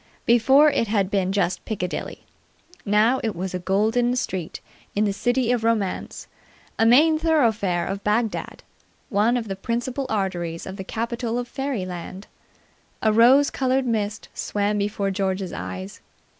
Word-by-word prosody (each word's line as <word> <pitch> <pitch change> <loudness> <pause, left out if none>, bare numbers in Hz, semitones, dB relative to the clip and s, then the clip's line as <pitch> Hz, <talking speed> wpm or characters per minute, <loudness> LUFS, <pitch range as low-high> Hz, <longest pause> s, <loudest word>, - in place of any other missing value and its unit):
Before 265 +6 +5
it 230 - 0
had 200 -2 0
been 190 -2 +1
just 195 -2 0
Piccadilly. 180 -5 -4 0.6
Now 215 +5 +3
it 220 -3 -2
was 185 +2 -4
a 180 - -2
golden 220 +7 +1
street 185 -9 -3 0.4
in 210 +1 +2
the 200 - 0
City 245 +3 +1
of 240 -2 0
Romance, 220 -5 -1 0.5
a 225 - +4
main 310 +6 +5
thoroughfare 225 - +1
of 195 +2 -4
Bagdad, 215 +1 -1 0.5
one 215 +5 +2
of 230 -2 -4
the 195 - -3
principal 240 +6 -3
arteries 175 -5 -2
of 190 +1 -7
the 190 - -5
capital 235 +3 -3
of 245 0 -3
Fairyland. 195 -8 -5 0.8
A 220 -1 +3
rose 255 +6 +5
coloured 260 0 0
mist 210 -3 -2
swam 205 0 -1
before 200 -1 -1
George's 190 -2 -2
eyes. 95 +1 -7
215 Hz, 145 wpm, -23 LUFS, 190-240 Hz, 0.8 s, Before